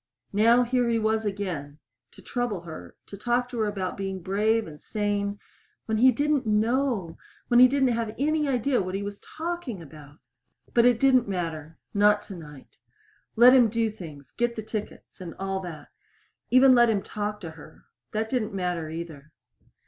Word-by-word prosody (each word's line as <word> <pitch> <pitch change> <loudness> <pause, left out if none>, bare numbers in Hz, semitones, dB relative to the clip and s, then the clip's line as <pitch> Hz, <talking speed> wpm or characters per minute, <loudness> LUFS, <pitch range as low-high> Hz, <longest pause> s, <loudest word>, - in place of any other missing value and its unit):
Now 230 +4 +5
here 245 0 +1
he 230 - +2
was 220 0 0
again 175 -8 -4 0.3
to - - -16
trouble 245 -7 -2
her, 160 - -10
to - - -10
talk 240 +4 0
to 240 - -5
her 215 - +1
about 195 -3 -3
being 195 -1 -4
brave 210 +5 +1
and 150 -2 -11
sane 205 -1 -2 0.5
when 220 -1 -1
he 255 +2 +7
didn't 285 0 0
know 220 -4 0 0.3
when 240 -1 +5
he 255 - +9
didn't 265 0 +2
have 230 -2 -2
any 300 +2 +1
idea 255 0 +1
what 185 0 -4
he 200 - -3
was 205 0 -6
talking 330 - -5
about! 150 -2 -13 0.6
But 235 0 +5
it 245 -2 +4
didn't 255 -3 +4
matter 165 -4 -4 0.2
not 205 0 +4
tonight. 155 -9 -12 0.6
Let 245 +3 +8
him 245 -4 +6
do 225 0 0
things 155 -9 -11
get 240 0 -1
the 220 - -5
tickets 215 -2 -7
and 175 -2 -7
all 195 0 -2
that. 170 -5 -9 0.6
Even 255 +1 +7
let 240 -1 +5
him 205 -3 0
talk 210 0 -4
to 165 -3 -7
her. 160 0 -15 0.3
That 220 +1 -1
didn't 220 -4 -2
matter 180 -4 -2
either. 160 -3 -8
210 Hz, 175 wpm, -26 LUFS, 180-240 Hz, 0.6 s, he